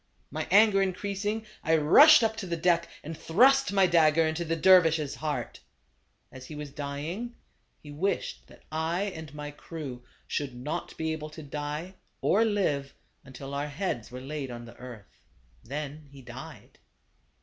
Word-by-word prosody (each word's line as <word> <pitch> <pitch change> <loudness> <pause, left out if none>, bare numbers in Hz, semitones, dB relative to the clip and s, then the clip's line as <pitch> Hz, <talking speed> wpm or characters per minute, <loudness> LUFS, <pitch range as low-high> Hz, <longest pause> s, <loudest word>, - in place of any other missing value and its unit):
"My 155 +3 -3
anger 205 0 +6
increasing, 200 +3 -2 0.2
I 160 +1 +3
rushed 235 - +8
up 220 0 +1
to 195 - -5
the 170 -1 -2
deck, 170 0 +2 0.2
and 160 +2 -6
thrust 265 - +4
my 195 -1 +4
dagger 165 -2 +4
into 160 +2 -1
the 165 0 -1
dervis' 165 -4 +5
heart. 145 -6 -4 0.7
As 130 -1 -11
he 155 - -8
was 150 -1 -7
dying, 150 - -5 0.5
he 145 - -10
wished 180 +8 -2
that - - -18
I 160 +4 -1
and 160 -7 -6
my 150 0 -6
crew 145 -5 -8 0.2
should 140 -4 -3
not 135 +6 -5
be 160 0 -1
able 155 -1 -6
to 155 +1 -10
die, 150 +5 -5 0.3
or 220 - +3
live, 180 -11 0 0.3
until 135 +1 -9
our 140 +1 -2
heads 145 - -3
were 125 +1 -8
laid 140 0 -5
on 120 -1 -7
the 115 - -13
earth. 120 -5 -12 0.4
Then 145 +2 -6
he 140 -1 -13
died. - - -11
155 Hz, 160 wpm, -28 LUFS, 145-185 Hz, 0.7 s, rushed